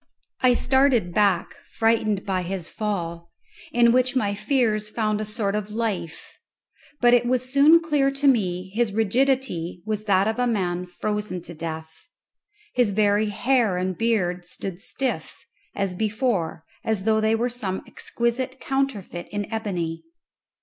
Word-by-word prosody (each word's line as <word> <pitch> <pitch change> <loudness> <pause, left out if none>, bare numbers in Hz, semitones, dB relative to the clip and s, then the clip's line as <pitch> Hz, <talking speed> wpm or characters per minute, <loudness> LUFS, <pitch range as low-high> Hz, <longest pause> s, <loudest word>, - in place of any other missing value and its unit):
I 250 -1 +5
started 260 -9 +3
back 200 -4 +2 0.2
frightened 220 -3 +2
by 190 -2 0
his 180 -1 -5
fall, 170 -5 -3 0.4
in 235 -1 +5
which 255 +2 +2
my 205 -6 +1
fears 215 -1 0
found 215 -1 -1
a - - -2
sort 210 -2 -2
of 210 0 -2
life; 210 -7 -4 0.6
but 240 -1 +5
it 240 0 +4
was 255 +1 0
soon 295 +4 +7
clear 295 -4 +1
to 275 +1 0
me 190 -7 +1
his 225 -2 +1
rigidity 225 -6 0
was 215 -1 -3
that 195 -1 +3
of 220 +2 -1
a 245 - +2
man 180 -5 -1
frozen 210 0 -3
to 175 - -9
death. 160 0 -6 0.8
His 245 -4 +3
very 205 +1 +2
hair 230 -2 +2
and 185 0 -1
beard 180 -5 0
stood 180 +1 -7
stiff, 270 -1 -3 0.4
as 195 -2 -1
before, 210 -6 -1 0.2
as 220 -4 -1
though 220 +1 +2
they 220 +1 +3
were 235 +2 0
some 210 -6 -3
exquisite 250 +2 -2
counterfeit 270 -10 -2
in 205 0 -3
ebony. 175 -7 -3
215 Hz, 150 wpm, -24 LUFS, 185-240 Hz, 0.8 s, soon